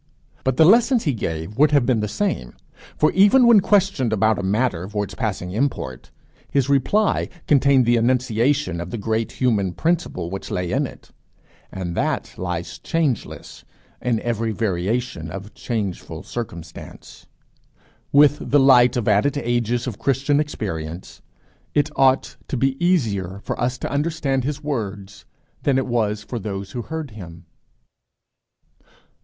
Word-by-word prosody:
But 130 -1 0
the 160 - +7
lessons 235 - +5
he 145 - +1
gave 85 +1 -4
would 150 +1 +6
have 145 -4 +3
been 125 -3 +2
the 105 - -1
same; 140 - -2 0.4
for 155 - +3
even 205 +7 +5
when 235 -3 +7
questioned 195 - +2
about 110 0 +2
a - - -1
matter 95 -2 0
for 105 -1 -1
its 100 - -7
passing 100 -7 -3
import, 100 - -3 0.4
his 140 -1 +1
reply 170 +10 +2 0.2
contained 140 -3 +4
the 120 0 +3
enunciation 125 - +1
of 85 - -6
the 120 - -4
great 110 +1 -2
human 105 -8 0
principle 150 - -1
which 95 - -6
lay 90 -1 -2
in - - +1
it, - - -15 0.6
and 90 -3 -5
that - - -1
lies 85 -2 -4
changeless 155 - -3 0.4
in 120 -3 0
every 115 -1 -1
variation 100 -3 -2
of 100 +5 -8
changeful 105 -7 -4
circumstance. 85 -9 -9 0.8
With 145 +1 +4
the 145 - +5
light 125 -3 +5
of 120 - -2
added 110 +8 +2
ages 120 -2 -1
of 120 -6 -5
Christian 140 +2 +1
experience, 90 - -5 0.5
it 150 +1 +2
ought 135 0 +2
to 135 - -3
be 135 +5 0
easier 100 - 0
for - - -4
us 125 +1 0
to - - -5
understand 140 -3 -1
his 150 +1 -3
words 100 -8 -5 0.4
than 140 -2 +2
it 135 - 0
was 110 -4 -1
for 120 +2 -5
those 100 -1 -5
who 120 - -4
heard 160 +1 -6
him. 85 -5 -11
120 Hz, 150 wpm, -22 LUFS, 100-140 Hz, 0.8 s, the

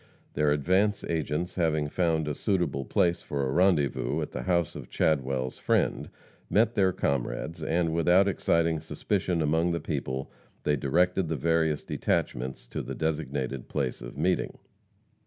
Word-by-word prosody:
Their 75 0 +2
advance 95 +8 +2
agents, 80 +2 -2
having 80 -4 +1
found 80 -1 0
a 75 - -1
suitable 85 - -1
place 85 +6 +1
for 70 -2 -2
a 65 - -1
rendezvous 85 -4 +2
at - - -6
the - - -4
house 85 -3 0
of - - -8
Chadwell's 65 -4 0
friend, - - +1 0.4
met 115 +2 +3
their 95 -4 +3
comrades, 70 +2 -2
and, 80 +1 0
without 90 +4 +4
exciting 85 -3 +1
suspicion 85 +1 -1
among 80 +3 +2
the 85 - -1
people, 65 -4 -3 0.3
they 75 - +2
directed 90 +6 +1
the 80 - 0
various 80 +1 +1
detachments 65 0 -2
to - - -3
the - - -6
designated 70 -4 -2
place 65 -5 -2
of - - -9
meeting. 90 +4 0
80 Hz, 150 wpm, -28 LUFS, 70-90 Hz, 0.4 s, without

